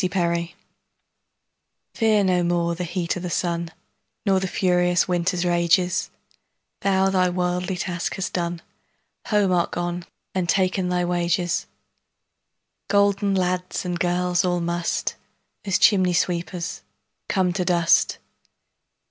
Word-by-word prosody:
Fidele 170 -2 -1 1.4
FEAR 220 -3 +3
no 180 -2 +2
more 170 0 +1
the 175 +2 -4
heat 175 0 -2
o' - - -4
the 180 0 -4
sunNor 170 +3 -3
the 190 - -1
furious 180 -1 +2
winter's 180 0 0
rages; 175 +1 +2 0.7
Thou 195 -1 +2
thy 185 -1 +3
worldly 180 +1 -1
task 175 -2 -3
hast 190 - -4
done, 170 -1 -2 0.6
Home 205 -4 +2
art 175 -1 +2
gone 175 0 -3 0.3
and 180 -2 -1
ta'en 185 0 +1
thy 180 0 +1
wages:Golden 190 +3 -2
lads 180 0 -1
and 175 -1 -2
girls 180 +1 +1
all 175 -1 +1
must, 170 0 -1 0.5
As 195 -3 +2
chimney 185 -3 +4
sweepers, 170 - -2 0.5
come 185 -2 +1
to 185 0 -1
dust. 170 -2 +3
180 Hz, 115 wpm, -23 LUFS, 175-185 Hz, 1.4 s, chimney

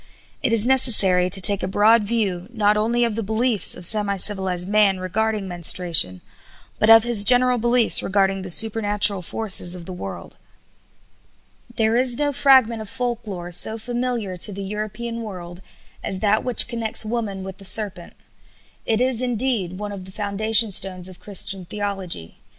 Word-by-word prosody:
It - - -1
is 230 -1 +2
necessary 205 -9 +3
to 190 - +5
take 200 +1 +3
a - - -3
broad 215 +3 +3
view, 200 -5 -3
not 210 -3 +1
only 230 +3 0
of 230 -2 -1
the 225 - -3
beliefs 220 +1 0
of 180 - -3
semi 205 0 +2
civilized 185 -2 0
man 205 -2 +1
regarding 210 +2 -3
menstruation, 170 - +2 0.6
but 215 - +1
of 225 0 +7
his 235 -4 +1
general 250 +2 +4
beliefs 240 0 +4
regarding 195 0 -1
the 185 - -8
supernatural 205 -1 +3
forces 185 -2 +1
of 175 -2 -10
the 185 - -8
world. 95 - -9 1.4
There 225 +1 0
is 250 -1 +2
no 290 -1 -1
fragment 260 -5 +3
of 215 - -10
folk 240 -1 -5
lore 175 -3 -7
so 220 +5 +2
familiar 240 -4 -4
to 205 - -2
the 200 0 -7
European 215 +3 -6
world 180 -4 -10 0.4
as 190 - -5
that 215 0 +1
which 250 -2 +2
connects 230 -2 +1
woman 215 -4 -5
with 190 0 -9
the - - -11
serpent. 195 -3 0 0.7
It 225 +1 0
is, 255 -2 -1
indeed, 235 -7 -2
one 205 0 -7
of 195 -2 -9
the 190 - -13
foundation 215 +2 0
stones 185 -1 -3
of 185 - -15
Christian 200 -1 -1
theology. 195 - -6
210 Hz, 165 wpm, -20 LUFS, 190-230 Hz, 1.4 s, of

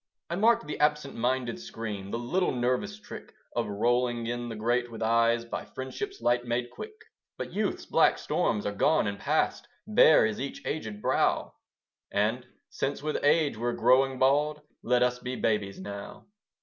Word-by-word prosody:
I - - 0
marked 230 +4 +3
the 150 - -5
absent 150 -2 +1
minded 125 0 -1
scream, 105 -4 -6
The 115 - -2
little 175 +11 0
nervous 130 +12 -1
trick - - -11 0.2
Of - - 0
rolling 120 +3 +1
in 120 +1 -3
the 115 - -5
grate, 120 +3 0
with 115 -1 -5
eyes 115 +1 +3
By 115 - -5
friendship's 390 - -6
light 120 0 +2
made 120 0 -2
quick. 435 0 -9 0.4
But - - -6
youth's 205 0 -1
black - - +4
storms 105 - 0
are 105 - 0
gone 155 +9 +3
and 100 -1 -3
past, - - 0 0.2
Bare - - +6
is 110 +2 -2
each 140 - -6
aged 110 -9 -4
brow; - - +1 0.6
And, 110 +5 0 0.2
since 140 +1 -3
with 150 -1 -2
age 145 -3 +3
we're 120 +2 -1
growing 130 +2 +3
bald, 150 +3 +2 0.2
Let 125 +1 +2
us 125 0 +1
be 125 +1 -4
babies 105 -4 -1
now. 100 +1 -8
120 Hz, 170 wpm, -28 LUFS, 115-145 Hz, 0.6 s, Bare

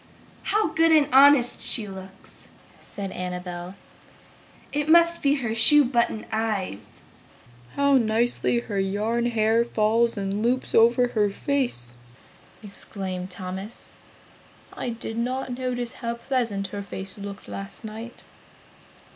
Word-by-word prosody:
"How 425 -4 +2
good 325 +1 +3
and 305 -3 +5
honest 270 -2 +6
she 220 -4 0
looks!" 190 0 -12 0.3
said 195 -2 -6
Annabel. 180 0 -6 1.0
"It 295 +1 -1
must 340 +1 +5
be 285 0 +3
her 240 -6 -2
shoe 270 +6 +6
button 235 -3 0
eyes!" 215 - -2 0.9
"How 280 -1 +4
nicely 235 +1 +1
her 205 -4 -4
yarn 215 +5 0
hair 225 0 +2
falls 230 0 +1
in 200 +1 -2
loops 250 +3 0
over 240 +2 +4
her 210 -3 +1
face!" 200 - -3 0.7
exclaimed 190 -2 -6
Thomas, 190 +4 -7 0.8
"I - - -4
did 225 -1 -6
not 255 +1 -2
notice 245 -2 -2
how 235 -2 -4
pleasant 235 -6 -2
her 205 +1 -5
face 195 0 -7
looked 200 0 -8
last 100 -1 -8
night!" 225 +2 -8
225 Hz, 120 wpm, -24 LUFS, 195-250 Hz, 1.0 s, honest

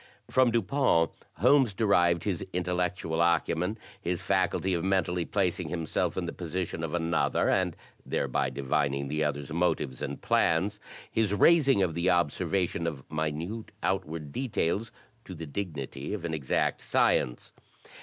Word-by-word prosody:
From 130 -1 +5
Dupin, 115 - +2 0.2
Holmes 125 - +4
derived 85 -5 +3
his 95 -5 -1
intel 90 0 -1
lectual 90 -2 -1
acumen, 85 +4 +1 0.2
his 90 -2 -2
faculty 95 0 +1
of 85 - -1
mentally 90 -2 +1
placing 90 -3 0
himself 80 -1 -1
in - - -1
the - - -4
position 85 -1 -4
of 80 +1 -2
another, 85 -1 +1
and - - +1 0.3
thereby 65 -3 0
divining 70 0 -1
the 75 +2 0
other's 75 0 -2
motives 85 -6 0
and - - -4
plans, 95 +5 +1 0.3
his 110 -2 +1
raising 135 - +5
of 85 -3 0
the 85 +3 +1
observation 85 0 +1
of 75 -5 -4
minute 80 +8 -3
outward 75 -1 -2
details 110 - -1 0.3
to 95 - -9
the 80 0 -6
dignity 75 -2 -4
of 90 -5 -6
an 80 - -3
exact 75 -5 0
science. - - +1
85 Hz, 145 wpm, -29 LUFS, 80-95 Hz, 0.3 s, From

